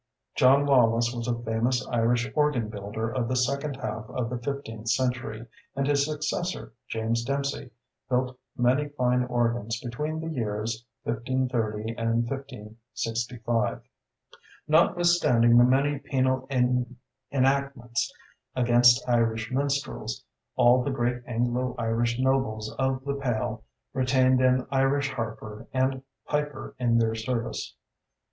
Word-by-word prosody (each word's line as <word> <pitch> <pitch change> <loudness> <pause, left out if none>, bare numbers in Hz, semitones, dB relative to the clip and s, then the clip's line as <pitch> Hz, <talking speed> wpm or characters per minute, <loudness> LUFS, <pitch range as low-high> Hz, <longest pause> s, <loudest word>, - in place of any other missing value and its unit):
John 135 +2 +5
Lawless 120 -3 +4
was 120 -1 -4
a 120 -1 0
famous 120 +2 0
Irish 120 +1 +2
organ 150 -7 +1
builder 105 +2 -4
of 115 +1 -2
the 130 - -1
second 140 +3 0
half 110 -3 -5
of 125 -2 -3
the 125 - -3
fifteenth 115 -4 -5
century, 125 -3 -1 0.3
and 135 0 0
his 140 0 +3
successor, 155 +1 -3
James 115 0 -1
Dempsey, 140 0 -2 0.4
built 125 0 0 0.2
many 130 +4 +2
fine 125 -3 +1
organs 120 -2 -1
between 150 +7 -4
the 160 0 -4
years 110 -2 -3 0.2
1530 115 -2 -1
and 115 +1 +1
1565. 115 -2 -3 0.8
Notwithstanding 155 -8 +4
the - - +8
many 135 +3 +2
penal 130 -1 0 0.8
enactments 135 -3 0 0.4
against 120 0 +5
Irish 115 -2 +1
minstrels, 140 - -2 0.3
all 125 +1 +5
the 140 - -1
great 120 -2 -1
Anglo 125 +1 -1
Irish 115 0 0
nobles 130 -5 0
of 130 0 0
the 140 - -1
Pale 110 -3 -2 0.3
retained 130 0 +3
an 130 0 +3
Irish 135 +1 +2
harper 110 -3 -6
and 130 0 0 0.2
piper 150 -2 -3
in 120 -2 +3
their 115 -1 +2
service. 115 +1 -3
125 Hz, 120 wpm, -27 LUFS, 115-135 Hz, 0.8 s, the